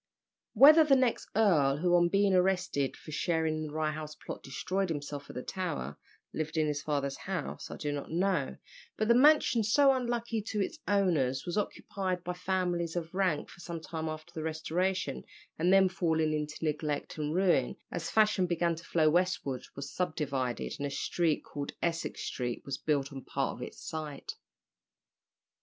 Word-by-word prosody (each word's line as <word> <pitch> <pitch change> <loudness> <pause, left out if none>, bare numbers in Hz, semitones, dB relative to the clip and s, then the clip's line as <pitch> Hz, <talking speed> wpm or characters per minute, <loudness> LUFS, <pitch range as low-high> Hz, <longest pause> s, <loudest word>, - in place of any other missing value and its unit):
Whether 295 +7 +9
the 290 -3 +5
next 255 -3 +1
earl, 155 -11 +4
who 175 +3 +3
on 175 0 +4
being 200 +1 +3
arrested 180 -7 +1
for 155 - -11
sharing 160 0 0
in 155 - -3
the - - -8
Rye 155 0 0
House 155 0 -6
plot - - -8
destroyed 185 +7 -2
himself 145 -2 -5
at - - -9
the 125 - -4
Tower, 120 - -4 0.3
lived 155 +1 -3
in 155 - +3
his 150 -1 -1
father's 140 -2 -1
house, 185 -5 -5
I - - -7
do 150 - -2
not 145 -1 -4
know, 175 -3 0 0.4
but 215 - 0
the 235 - +6
mansion, 255 -3 +5
so 270 +6 +5
unlucky 235 -3 -1
to 210 0 -3
its 205 +10 -2
owners, 160 -11 +2
was 175 - -3
occupied 190 -3 -2
by 180 - -3
families 180 -2 -1
of 170 -1 -4
rank 185 -6 0
for - - -15
some 170 -1 -5
time 160 0 -4
after 155 +2 -8
the 160 - -4
Restoration, 160 0 -1 0.4
and 175 +3 +3
then 195 0 +6
falling 160 -4 +1
into 150 +1 -3
neglect 150 0 -2
and 150 +1 -1
ruin, 180 -9 +2 0.2
as 165 - -3
fashion 210 -4 +3
began 170 0 +1
to 165 +1 -8
flow 160 -2 +2
westward, 160 -6 0
was 140 0 -6
subdivided, 140 -8 -2
and 145 - -1
a - - -4
street, 160 +3 0
called 140 -1 -6
Essex 170 -1 -2
Street, 120 -2 -3
was 140 -1 -4
built 140 -2 0
on 135 -2 -7
part - - -2
of - - -10
its - - -7
site. 155 -3 -6
165 Hz, 180 wpm, -31 LUFS, 150-190 Hz, 0.4 s, Whether